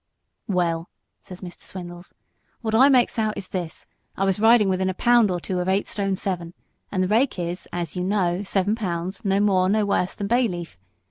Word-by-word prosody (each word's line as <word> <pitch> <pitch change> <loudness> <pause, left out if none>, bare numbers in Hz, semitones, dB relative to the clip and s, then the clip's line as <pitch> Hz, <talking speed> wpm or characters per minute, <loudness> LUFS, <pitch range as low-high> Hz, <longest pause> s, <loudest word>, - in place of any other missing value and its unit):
"Well," 170 -3 0 0.3
said 185 -1 -11
Mr. 180 -2 -9
Swindles, 175 -1 -9 0.5
"what 220 -2 -2
I 260 +5 +6
makes 250 -3 +3
out 215 -1 0
is 185 - -6
this. 175 -4 -5 0.3
I 195 - +1
was 195 0 +1
riding 225 -1 +5
within 190 0 +1
a 185 - -3
pound 240 -1 +4
or 180 -1 -1
two 180 +1 -3
of 180 - -2
nine 190 +2 +1
stone, 195 -2 -2 0.8
and 185 -2 +1
The - - 0
Rake 230 +4 +2
is, 175 +1 -4
as 175 -3 -4
you 180 - -2
know, 185 -2 +1
seven 200 0 0
pounds, 185 -1 -3
no 195 -1 +2
more, 190 -3 +3 0.2
worse 190 -2 0
than 200 - -4
Bayleaf. 195 - 0
190 Hz, 190 wpm, -24 LUFS, 180-210 Hz, 0.8 s, I